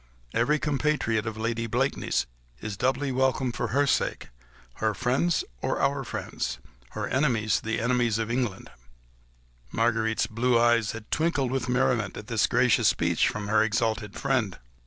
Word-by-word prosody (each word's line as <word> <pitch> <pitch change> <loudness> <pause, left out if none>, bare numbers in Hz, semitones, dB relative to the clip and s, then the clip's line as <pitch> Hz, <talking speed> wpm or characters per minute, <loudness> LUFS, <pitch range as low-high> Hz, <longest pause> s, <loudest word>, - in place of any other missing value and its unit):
Every 140 +6 +2
compatriot 140 -7 0
of 110 -1 -4
Lady 115 +1 -2
Blakeney's 125 +5 0 0.3
is 105 -2 -5
doubly 130 +5 0
welcome 130 0 +1
for 120 +1 -2
her 140 +6 +2
sake... 140 - 0 0.5
her 110 -1 0
friends 130 - +1 0.2
are - - -1
our 140 0 +1
friends... - - -4 0.4
her - - -3
enemies, 120 -6 +1
the 110 +1 -2
enemies 120 -1 +1
of 115 0 -2
England." 120 -6 -2 1.0
Marguerite's 110 -2 +1
blue 115 +2 +1
eyes 120 -2 +3
had 115 -1 -10
twinkled 150 -6 +1
with 130 -1 -2
merriment 125 -5 +1
at 105 - -7
this 115 -3 +1
gracious 125 0 +3
speech - - +2
from 105 -1 -3
her 105 0 +4
exalted 110 -1 0
friend. - - 0
120 Hz, 150 wpm, -27 LUFS, 110-130 Hz, 1.0 s, her